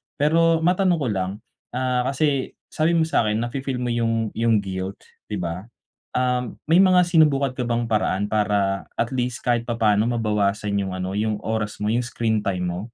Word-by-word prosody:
Pero 165 Hz, +2 st, +3 dB
matanong 180 Hz, -1 st, +2 dB
ko 135 Hz, -, 0 dB
lang, 95 Hz, -2 st, -1 dB, 0.4 s
ah, 125 Hz, -1 st, 0 dB
kasi, 140 Hz, -1 st, 0 dB, 0.2 s
sabi 160 Hz, +2 st, +1 dB
mo 160 Hz, -, +4 dB
sa 140 Hz, -8 st, +1 dB
'kin 110 Hz, +2 st, 0 dB
nafi-feel 130 Hz, +1 st, -3 dB
mo 120 Hz, -, -1 dB
yung 115 Hz, -2 st, 0 dB
yung 115 Hz, -1 st, +2 dB
guilt 95 Hz, 0 st, -4 dB, 0.3 s
'di 105 Hz, -, -3 dB
ba? 85 Hz, +5 st, -5 dB, 0.5 s
Ah, 125 Hz, 0 st, +1 dB, 0.2 s
may 165 Hz, +4 st, +5 dB
mga 185 Hz, -2 st, +5 dB
sinubukan 145 Hz, -6 st, +3 dB
ka 130 Hz, -, -3 dB
bang 120 Hz, 0 st, -1 dB
paraan 105 Hz, -2 st, 0 dB
para 100 Hz, -2 st, 0 dB
at 115 Hz, -, +1 dB
least 125 Hz, -1 st, -2 dB
kahit 120 Hz, -1 st, +2 dB
papano 110 Hz, -3 st, +2 dB
mabawasan 105 Hz, -3 st, 0 dB
yung 95 Hz, -1 st, -4 dB
ano, 95 Hz, +1 st, -3 dB
yung 105 Hz, 0 st, 0 dB
oras 110 Hz, -1 st, -3 dB
mo, 105 Hz, -, -1 dB
yung 120 Hz, +2 st, +1 dB
screen 115 Hz, -3 st, -1 dB
time 90 Hz, -3 st, -1 dB
mo? 90 Hz, +1 st, -3 dB
115 Hz, 180 wpm, -23 LUFS, 105-135 Hz, 0.5 s, may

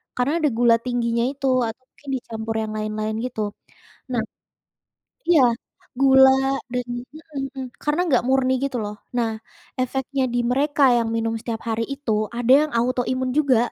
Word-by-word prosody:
karena 250 Hz, +4 st, +1 dB
ada 300 Hz, -, +2 dB
gula 235 Hz, -1 st, +5 dB
tingginya 235 Hz, -1 st, 0 dB
itu 275 Hz, -1 st, -3 dB, 0.2 s
atau 225 Hz, +3 st, -7 dB
mungkin 280 Hz, -, -13 dB
dicampur 225 Hz, -2 st, -5 dB
yang 215 Hz, -1 st, -4 dB
lain-lain, 215 Hz, 0 st, -2 dB
gitu. 250 Hz, -3 st, -4 dB, 0.7 s
Nah 240 Hz, -, +1 dB, 1.1 s
iya, 325 Hz, -5 st, +6 dB, 0.6 s
gula 265 Hz, -1 st, +7 dB, 0.4 s
dan 250 Hz, 0 st, -1 dB
juga 265 Hz, +6 st, -11 dB
heeh 275 Hz, -2 st, -3 dB
heeh, 265 Hz, -1 st, -4 dB, 0.2 s
karena 295 Hz, +3 st, 0 dB
nggak 250 Hz, -, +3 dB
murni 265 Hz, -1 st, +3 dB
gitu 275 Hz, -2 st, -2 dB
loh, 205 Hz, 0 st, -5 dB, 0.2 s
nah 235 Hz, -2 st, +1 dB, 0.5 s
efeknya 265 Hz, +1 st, -1 dB
di -, -, +2 dB
mereka 285 Hz, +3 st, +1 dB
yang 230 Hz, -1 st, +1 dB
minum 225 Hz, 0 st, 0 dB
setiap 230 Hz, -1 st, -5 dB
hari 225 Hz, 0 st, 0 dB
itu 275 Hz, -5 st, -3 dB, 0.2 s
ada 245 Hz, +1 st, +3 dB
yang 305 Hz, -, -2 dB
autoimun 255 Hz, +1 st, 0 dB
juga, 275 Hz, -6 st, +4 dB
250 Hz, 155 wpm, -23 LUFS, 230-270 Hz, 1.1 s, gula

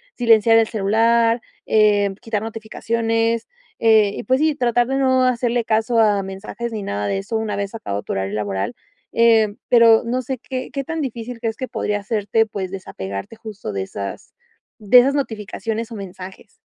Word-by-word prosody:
silenciar 225 Hz, -2 st, +5 dB
el 225 Hz, -1 st, +4 dB
celular, 230 Hz, +3 st, +2 dB, 0.2 s
eh, 205 Hz, -2 st, +3 dB
quitar 220 Hz, -2 st, -3 dB
notificaciones, 225 Hz, +1 st, -1 dB, 0.3 s
eh, 220 Hz, -3 st, +4 dB
y -, -, -5 dB
pues 260 Hz, +6 st, +1 dB
sí, 310 Hz, 0 st, +3 dB
tratar 245 Hz, -3 st, +1 dB
de 270 Hz, +1 st, -1 dB
no 260 Hz, -1 st, +3 dB
hacerle 245 Hz, -1 st, +1 dB
caso 225 Hz, +2 st, 0 dB
a 210 Hz, -3 st, +3 dB
mensajes, 205 Hz, +5 st, -6 dB
ni 215 Hz, -2 st, -4 dB
nada 100 Hz, -, -3 dB
de 100 Hz, -1 st, -1 dB
eso, 220 Hz, -, -3 dB
una 220 Hz, -2 st, -2 dB
vez 200 Hz, 0 st, -4 dB
acabado 100 Hz, -, -4 dB
tu -, -, -6 dB
horario 95 Hz, +1 st, -3 dB
laboral, 100 Hz, +1 st, -2 dB, 0.4 s
eh, 225 Hz, -3 st, +4 dB
pero 230 Hz, -2 st, +6 dB
no 250 Hz, +2 st, -1 dB
sé, 260 Hz, +1 st, -4 dB
¿qué 255 Hz, +1 st, -5 dB
qué 275 Hz, -1 st, -3 dB
tan 325 Hz, +4 st, -4 dB
difícil 240 Hz, -3 st, -5 dB
crees 225 Hz, -1 st, -2 dB
que 255 Hz, -, -4 dB
podría 205 Hz, -1 st, -2 dB
serte, 215 Hz, +1 st, +1 dB
pues 195 Hz, -3 st, -5 dB
desapegarte, 100 Hz, -, -7 dB
justo 215 Hz, -, -7 dB
de 95 Hz, -1 st, -2 dB
esas, 100 Hz, 0 st, -7 dB, 0.4 s
de 225 Hz, +2 st, +6 dB
esas 270 Hz, +3 st, +3 dB
notificaciones 225 Hz, -3 st, -3 dB
o -, -, -6 dB
mensajes? 190 Hz, 0 st, -10 dB
225 Hz, 175 wpm, -20 LUFS, 200-235 Hz, 0.4 s, pero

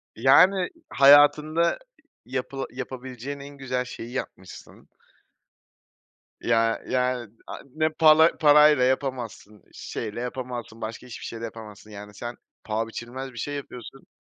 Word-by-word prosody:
Yani, 180 Hz, -, +5 dB, 0.2 s
hayatında 145 Hz, -, +5 dB, 0.5 s
yapıla 130 Hz, +1 st, -4 dB
yapabileceğin 130 Hz, +1 st, -7 dB
en 140 Hz, 0 st, -11 dB
güzel 125 Hz, -2 st, -3 dB
şeyi 120 Hz, -1 st, -9 dB
yapmışsın. 95 Hz, -7 st, -9 dB, 1.5 s
Ya, 115 Hz, -1 st, +1 dB
yani, 125 Hz, -3 st, -1 dB, 0.2 s
ay, -, -, -8 dB
ne 155 Hz, 0 st, +1 dB
pal 160 Hz, 0 st, +5 dB
parayla 150 Hz, -3 st, +6 dB
yapamazsın, 125 Hz, -6 st, -3 dB
şeyle 110 Hz, +1 st, -6 dB
yapamazsın, 120 Hz, -2 st, -6 dB
başka 110 Hz, +3 st, -7 dB
hiçbir 120 Hz, -, -9 dB
şey 115 Hz, -, -6 dB
ile 115 Hz, -, -5 dB
yapamazsın. 110 Hz, -1 st, -11 dB
Yani, 105 Hz, 0 st, -10 dB
sen 120 Hz, +3 st, -7 dB, 0.3 s
paha 110 Hz, +1 st, -2 dB
biçilmez 130 Hz, +4 st, -7 dB
bir -, -, -14 dB
şey 145 Hz, +6 st, -4 dB
yapıyorsun. 130 Hz, -2 st, -10 dB
125 Hz, 120 wpm, -25 LUFS, 115-140 Hz, 1.5 s, parayla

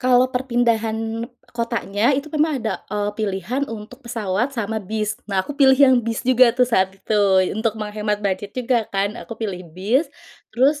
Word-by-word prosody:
Kalau 255 Hz, 0 st, +3 dB
perpindahan 230 Hz, -2 st, 0 dB, 0.2 s
kotanya, 235 Hz, +1 st, 0 dB
itu 285 Hz, +2 st, -5 dB
memang 310 Hz, +1 st, +2 dB
ada, 220 Hz, -, -1 dB
eee, 205 Hz, 0 st, -1 dB
pilihan 215 Hz, +6 st, -2 dB
untuk 225 Hz, +3 st, -8 dB
pesawat 220 Hz, +1 st, -1 dB
sama 220 Hz, 0 st, -2 dB
bis. 215 Hz, +2 st, -2 dB, 0.2 s
Nah 190 Hz, -2 st, 0 dB
aku -, -, -5 dB
pilih 265 Hz, -2 st, +6 dB
yang 260 Hz, -2 st, +6 dB
bis 230 Hz, 0 st, -3 dB
juga 250 Hz, -2 st, +5 dB
tuh 250 Hz, -, +5 dB
saat 190 Hz, -5 st, +3 dB
itu, 210 Hz, +2 st, 0 dB, 0.3 s
untuk 220 Hz, +1 st, -1 dB
menghemat 210 Hz, -1 st, -2 dB
budget 200 Hz, +1 st, -1 dB
juga 240 Hz, -3 st, 0 dB
kan 200 Hz, +1 st, -1 dB
aku 230 Hz, -, -8 dB
pilih 200 Hz, -5 st, -4 dB, 0.2 s
bis, 245 Hz, -, +1 dB, 0.5 s
terus, 285 Hz, +4 st, +3 dB
225 Hz, 165 wpm, -21 LUFS, 210-255 Hz, 0.5 s, pilih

